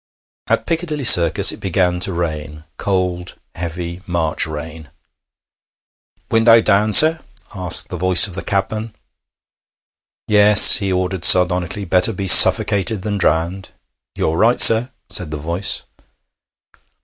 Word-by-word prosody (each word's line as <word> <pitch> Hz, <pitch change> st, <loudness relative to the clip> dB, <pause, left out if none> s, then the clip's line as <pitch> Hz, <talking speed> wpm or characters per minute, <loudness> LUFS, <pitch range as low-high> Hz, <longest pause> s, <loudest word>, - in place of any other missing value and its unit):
At -, -, -3 dB
Piccadilly 160 Hz, -3 st, -6 dB
Circus 85 Hz, -8 st, +4 dB
it -, -, -13 dB
began 90 Hz, -1 st, -3 dB
to 95 Hz, -, -4 dB
rain 75 Hz, -3 st, -8 dB
cold, 90 Hz, -2 st, -5 dB, 0.2 s
heavy 85 Hz, +1 st, -9 dB
March 85 Hz, -4 st, -2 dB
rain. 80 Hz, -1 st, -11 dB, 1.4 s
'Window 115 Hz, 0 st, +2 dB
down, 105 Hz, 0 st, -1 dB
sir?' 160 Hz, +8 st, +5 dB, 0.3 s
asked 90 Hz, -4 st, -1 dB
the 90 Hz, -, -8 dB
voice 90 Hz, +2 st, +3 dB
of 95 Hz, -, -14 dB
the 100 Hz, -, -7 dB
cabman. 105 Hz, +3 st, -6 dB, 1.3 s
'Yes,' 105 Hz, 0 st, +6 dB
he 100 Hz, -2 st, -5 dB
ordered 90 Hz, -1 st, -5 dB
sardonically. 90 Hz, +2 st, +1 dB
'Better 90 Hz, +5 st, -2 dB
be 100 Hz, 0 st, -8 dB
suffocated 100 Hz, +1 st, +4 dB
than 105 Hz, -1 st, -6 dB
drowned.' 85 Hz, +3 st, -4 dB, 0.5 s
'You're 80 Hz, +1 st, -4 dB
right, 115 Hz, +6 st, -1 dB
sir,' 115 Hz, +3 st, +4 dB, 0.2 s
said 90 Hz, -, -3 dB
the 75 Hz, -, -8 dB
voice. 85 Hz, +6 st, -5 dB
95 Hz, 125 wpm, -14 LUFS, 85-105 Hz, 1.4 s, Yes